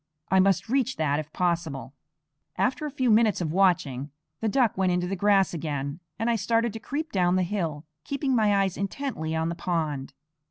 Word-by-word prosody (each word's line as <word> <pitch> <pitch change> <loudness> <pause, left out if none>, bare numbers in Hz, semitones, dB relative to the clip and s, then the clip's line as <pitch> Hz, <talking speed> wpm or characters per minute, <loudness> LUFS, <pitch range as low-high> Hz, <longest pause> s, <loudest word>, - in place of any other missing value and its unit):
I 190 - +5
must 195 +1 +3
reach 260 +1 +1
that 150 -2 +1
if 155 0 -6
possible. 160 -8 -2 0.6
After 270 +4 0
a - - -3
few 260 -4 +1
minutes 215 -1 +4
of 165 -4 -2
watching, 155 -7 +2 0.3
the 225 - 0
duck 245 -1 +2
went 185 -1 +2
into 180 0 0
the 190 +2 -2
grass 195 -1 +3
again, 145 -2 -3 0.2
and 225 - -1
I 235 -1 +2
started 230 +2 +1
to 225 - -6
creep 300 +7 -4
down 180 -2 +2
the 185 - +2
hill, 165 -5 -3 0.2
keeping 275 -2 -1
my 205 -3 +3
eyes 190 -2 -2
intently 195 - -3
on 160 +1 0
the - - -2
pond. 155 -6 -2
185 Hz, 195 wpm, -26 LUFS, 160-225 Hz, 0.6 s, I